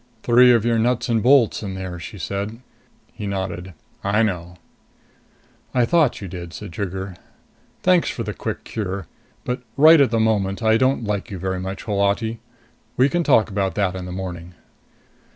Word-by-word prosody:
"Three 125 Hz, +1 st, +6 dB
of 115 Hz, -2 st, +3 dB
your 115 Hz, -1 st, +2 dB
nuts 120 Hz, +2 st, 0 dB
and 115 Hz, -2 st, +2 dB
bolts 125 Hz, -1 st, +4 dB
in 95 Hz, -3 st, -5 dB
there," 95 Hz, -2 st, -6 dB
she 95 Hz, +5 st, -8 dB
said. 100 Hz, +6 st, -4 dB, 0.5 s
He 105 Hz, -, -6 dB
nodded. 95 Hz, -2 st, -4 dB, 0.3 s
"I 105 Hz, +3 st, +2 dB
know." 90 Hz, -4 st, -3 dB, 1.2 s
"I 125 Hz, -2 st, +4 dB
thought 155 Hz, -3 st, +2 dB
you 100 Hz, -, -5 dB
did," 85 Hz, -1 st, -8 dB
said 80 Hz, -, -8 dB
Trigger. 95 Hz, 0 st, -4 dB, 0.7 s
"Thanks 180 Hz, -2 st, +4 dB
for -, -, -4 dB
the -, -, -4 dB
quick -, -, -5 dB
cure. 100 Hz, -3 st, -4 dB, 0.4 s
But 125 Hz, 0 st, -2 dB, 0.2 s
right 155 Hz, +2 st, +8 dB
at 135 Hz, -, +4 dB
the 115 Hz, 0 st, 0 dB
moment 105 Hz, -2 st, 0 dB
I 110 Hz, 0 st, +4 dB
don't 130 Hz, 0 st, +1 dB
like 105 Hz, -2 st, -3 dB
you 95 Hz, -, -5 dB
very 95 Hz, +1 st, -3 dB
much, 95 Hz, +1 st, -5 dB
Holati. 105 Hz, +2 st, 0 dB, 0.6 s
We 130 Hz, +2 st, +4 dB
can 175 Hz, +4 st, 0 dB
talk 115 Hz, -8 st, +3 dB
about 95 Hz, -1 st, -1 dB
that 95 Hz, -3 st, 0 dB
in 90 Hz, -1 st, -5 dB
the 90 Hz, -, -7 dB
morning." 90 Hz, -2 st, -6 dB
100 Hz, 175 wpm, -22 LUFS, 95-120 Hz, 1.2 s, right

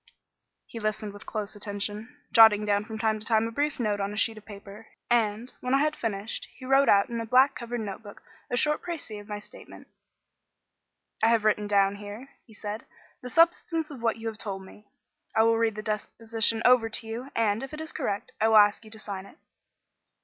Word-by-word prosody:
He 230 Hz, -, -8 dB
listened 215 Hz, -1 st, -3 dB
with 205 Hz, -, -13 dB
close 215 Hz, -1 st, -3 dB
attention, 205 Hz, +5 st, -4 dB
jotting 220 Hz, -2 st, +7 dB
down 205 Hz, 0 st, +1 dB
from 220 Hz, 0 st, -6 dB
time 220 Hz, -1 st, 0 dB
to 215 Hz, -, -10 dB
time 220 Hz, -1 st, +3 dB
a -, -, -6 dB
brief 290 Hz, +4 st, -1 dB
note 210 Hz, -3 st, 0 dB
on 200 Hz, 0 st, -2 dB
a -, -, -7 dB
sheet 225 Hz, 0 st, +1 dB
of -, -, -21 dB
paper; 205 Hz, +1 st, -11 dB, 0.2 s
and, 230 Hz, 0 st, +1 dB
when 250 Hz, +1 st, +1 dB
I 275 Hz, -, +3 dB
had 305 Hz, +1 st, +1 dB
finished, 215 Hz, -1 st, -4 dB
he 255 Hz, -, -11 dB
wrote 270 Hz, +1 st, +4 dB
out 200 Hz, -1 st, +5 dB
in 235 Hz, -1 st, -3 dB
a -, -, -4 dB
black 260 Hz, +4 st, +5 dB
covered 240 Hz, -4 st, -5 dB
notebook 205 Hz, 0 st, -8 dB, 0.3 s
a 245 Hz, -, -1 dB
short 300 Hz, +4 st, +2 dB
précis 305 Hz, -12 st, -6 dB
of 205 Hz, -, -16 dB
my 210 Hz, -1 st, -4 dB
statement. 205 Hz, -, -14 dB, 1.3 s
"I 220 Hz, -, +5 dB
have 225 Hz, -2 st, +3 dB
written 210 Hz, -1 st, +2 dB
down 200 Hz, -1 st, +3 dB
here," 205 Hz, +6 st, -9 dB, 0.2 s
he 220 Hz, -, -16 dB
said, 210 Hz, +1 st, -6 dB, 0.4 s
"the 250 Hz, -, -7 dB
substance 330 Hz, +1 st, +2 dB
of 265 Hz, -5 st, -9 dB
what 230 Hz, -1 st, +1 dB
you 225 Hz, -, -10 dB
have 220 Hz, -1 st, -5 dB
told 195 Hz, -2 st, -4 dB
me. 210 Hz, +2 st, -16 dB, 0.5 s
I 220 Hz, -, +5 dB
will 225 Hz, 0 st, +3 dB
read 225 Hz, -2 st, +1 dB
the 215 Hz, -, -6 dB
deposition 225 Hz, +1 st, -1 dB
over 245 Hz, -2 st, +5 dB
to 225 Hz, -, -2 dB
you, 235 Hz, +4 st, -6 dB
and, 220 Hz, -1 st, +1 dB
if 270 Hz, -, -7 dB
it 305 Hz, -, -7 dB
is 315 Hz, 0 st, -5 dB
correct, 200 Hz, 0 st, -3 dB
I 220 Hz, -, +4 dB
will 220 Hz, -1 st, +6 dB
ask 205 Hz, +1 st, +5 dB
you 215 Hz, -, -13 dB
to 220 Hz, -, -9 dB
sign 200 Hz, -3 st, -7 dB
it." -, -, -18 dB
220 Hz, 215 wpm, -27 LUFS, 205-240 Hz, 1.3 s, jotting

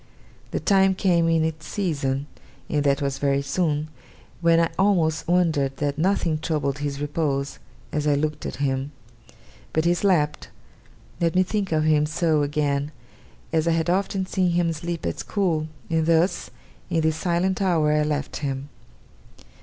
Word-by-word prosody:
The -, -, -2 dB
time 195 Hz, -2 st, +3 dB
came 170 Hz, -3 st, +2 dB
in 165 Hz, -1 st, +3 dB
its 160 Hz, -1 st, -4 dB
season, 140 Hz, -8 st, -1 dB, 0.4 s
and 150 Hz, -2 st, 0 dB
that 140 Hz, +1 st, +2 dB
was 135 Hz, -1 st, -2 dB
very 140 Hz, 0 st, +1 dB
soon, 155 Hz, 0 st, -1 dB, 0.5 s
when 165 Hz, -1 st, +4 dB
I 165 Hz, -1 st, +2 dB
almost 170 Hz, -6 st, +2 dB
wondered 160 Hz, -6 st, +1 dB
that 145 Hz, 0 st, -2 dB
nothing 170 Hz, -3 st, +1 dB
troubled 150 Hz, -3 st, -1 dB
his 145 Hz, -1 st, -3 dB
repose, 145 Hz, -2 st, -2 dB, 0.3 s
as 150 Hz, 0 st, -1 dB
I 145 Hz, -, +4 dB
looked 150 Hz, +1 st, -2 dB
at -, -, -5 dB
him. 135 Hz, +1 st, -2 dB, 0.8 s
But 160 Hz, +1 st, +1 dB
he 170 Hz, -, +4 dB
slept 175 Hz, -5 st, +1 dB, 0.7 s
let 165 Hz, -1 st, +1 dB
me 185 Hz, -, +5 dB
think 195 Hz, 0 st, -2 dB
of 155 Hz, -1 st, +2 dB
him 150 Hz, -1 st, +3 dB
so 155 Hz, -1 st, +1 dB
again 145 Hz, 0 st, 0 dB, 0.6 s
as 160 Hz, 0 st, +2 dB
I 165 Hz, -, +3 dB
had 165 Hz, +1 st, +1 dB
often 190 Hz, 0 st, 0 dB
seen 185 Hz, -2 st, 0 dB
him 170 Hz, -1 st, +1 dB
sleep 170 Hz, +1 st, -5 dB
at 85 Hz, -, -2 dB
school; 170 Hz, -7 st, 0 dB, 0.2 s
and 160 Hz, -1 st, 0 dB
thus, 165 Hz, +3 st, +2 dB, 0.4 s
in 165 Hz, -2 st, +1 dB
this 160 Hz, 0 st, +1 dB
silent 180 Hz, +2 st, 0 dB
hour, 165 Hz, -6 st, +2 dB
I 150 Hz, 0 st, +3 dB
left 150 Hz, -1 st, -2 dB
him. 140 Hz, -1 st, -4 dB
160 Hz, 160 wpm, -24 LUFS, 145-175 Hz, 0.8 s, me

